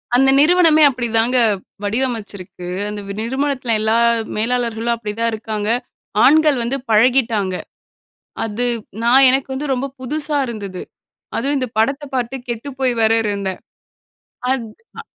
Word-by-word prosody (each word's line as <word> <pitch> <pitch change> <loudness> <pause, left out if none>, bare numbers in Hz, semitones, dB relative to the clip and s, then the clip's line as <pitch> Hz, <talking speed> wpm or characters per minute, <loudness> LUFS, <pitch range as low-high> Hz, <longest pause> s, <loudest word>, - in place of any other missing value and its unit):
அந்த 270 +2 +5
நிறுவனமே 320 0 +5
அப்படி 245 -3 -3
தாங்க 245 +3 +2 0.5
வடிவமைச்சிருக்கு, 205 -6 -4 0.2
அந்த 210 0 -5 0.2
நிறுவனத்தில 260 -1 -1
எல்லா 220 +1 +2 0.4
மேலாளர்களும் 235 0 -1
அப்படி 215 -2 -5
தான் 230 0 +1
இருக்காங்க. 215 -1 -3 0.5
ஆண்கள் 300 -1 +5
வந்து 250 +4 -1
பழகிட்டாங்க. 225 -4 +2 0.9
அது 225 +2 -2 0.4
நான் 260 +3 +6
எனக்கு 265 +1 +1
வந்து 275 +1 -3
ரொம்ப 260 +2 -2 0.2
புதுசா 295 +3 -1
இருந்தது. 200 -5 -6 0.6
அதும் 280 +5 0
இந்த 255 - -1
படத்தை 275 +6 +1
பார்த்து 245 +2 -2
கெட்டுப்போய் 255 +2 -2
வேற 220 0 +4
இருந்தேன். 200 -2 -3 0.9
அத் 235 -4 -3 0.3
ஆ. - - -4
240 Hz, 125 wpm, -19 LUFS, 220-270 Hz, 0.9 s, நான்